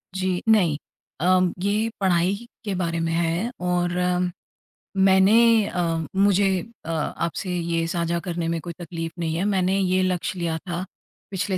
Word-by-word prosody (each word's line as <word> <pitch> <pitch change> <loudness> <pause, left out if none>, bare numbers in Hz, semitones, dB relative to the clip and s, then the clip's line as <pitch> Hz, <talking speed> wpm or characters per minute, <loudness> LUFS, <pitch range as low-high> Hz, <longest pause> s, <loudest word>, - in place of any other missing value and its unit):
जी 185 -1 -1
नहीं 175 -9 +4 0.5
अम 185 -1 +4
ये 210 +3 +1
पढ़ाई 185 0 +2 0.3
के 200 - -1
बारे 170 -2 -1
में 165 0 -1
है 170 +7 0
और 180 -1 0 1.1
मैंने 205 +4 +5
अ, 165 -2 -1
मुझे 195 -1 +3 0.3
अ, 165 - -3
आपसे 165 +4 -2
ये 170 0 -1
साझा 170 0 -1
करने 170 -1 -3
में 165 0 -1
कोई 170 +1 -6
तकलीफ 165 -1 -5
नहीं 160 -2 -1
है। 175 - 0
मैंने 190 -1 +1
ये 185 0 +2
लक्ष्य 185 0 -1
लिया 165 -2 -1
था, 175 +2 -5 0.5
पिछले 185 0 -1
180 Hz, 150 wpm, -24 LUFS, 170-190 Hz, 1.1 s, मैंने